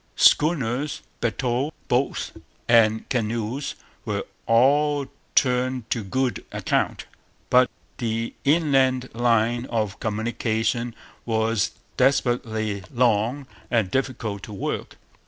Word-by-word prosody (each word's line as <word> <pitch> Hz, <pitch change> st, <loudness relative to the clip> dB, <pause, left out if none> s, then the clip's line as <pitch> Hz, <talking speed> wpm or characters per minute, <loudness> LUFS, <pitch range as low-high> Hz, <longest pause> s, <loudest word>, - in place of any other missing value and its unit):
Schooners, 145 Hz, -3 st, +3 dB, 0.2 s
bateaux, 125 Hz, +4 st, 0 dB, 0.2 s
boats, 125 Hz, +3 st, 0 dB, 0.4 s
and 110 Hz, -2 st, +4 dB
canoes 115 Hz, +3 st, -2 dB, 0.3 s
were -, -, -2 dB, 0.2 s
all 140 Hz, +5 st, +4 dB, 0.3 s
turned 125 Hz, -2 st, +1 dB
to 115 Hz, -, 0 dB
good 130 Hz, +5 st, -1 dB
account. -, -, -1 dB, 0.5 s
But 125 Hz, 0 st, +6 dB, 0.3 s
the 115 Hz, -1 st, -2 dB
inland 135 Hz, -4 st, +3 dB
line 120 Hz, 0 st, +2 dB
of 110 Hz, -4 st, -2 dB
communications 115 Hz, +1 st, -1 dB, 0.3 s
was 110 Hz, -2 st, +1 dB, 0.3 s
desperately 120 Hz, -6 st, +1 dB
long 120 Hz, +3 st, +2 dB, 0.2 s
and 110 Hz, -6 st, +1 dB
difficult 120 Hz, -6 st, -2 dB
to -, -, -7 dB
work. 100 Hz, -, -4 dB
120 Hz, 95 wpm, -24 LUFS, 110-130 Hz, 0.5 s, But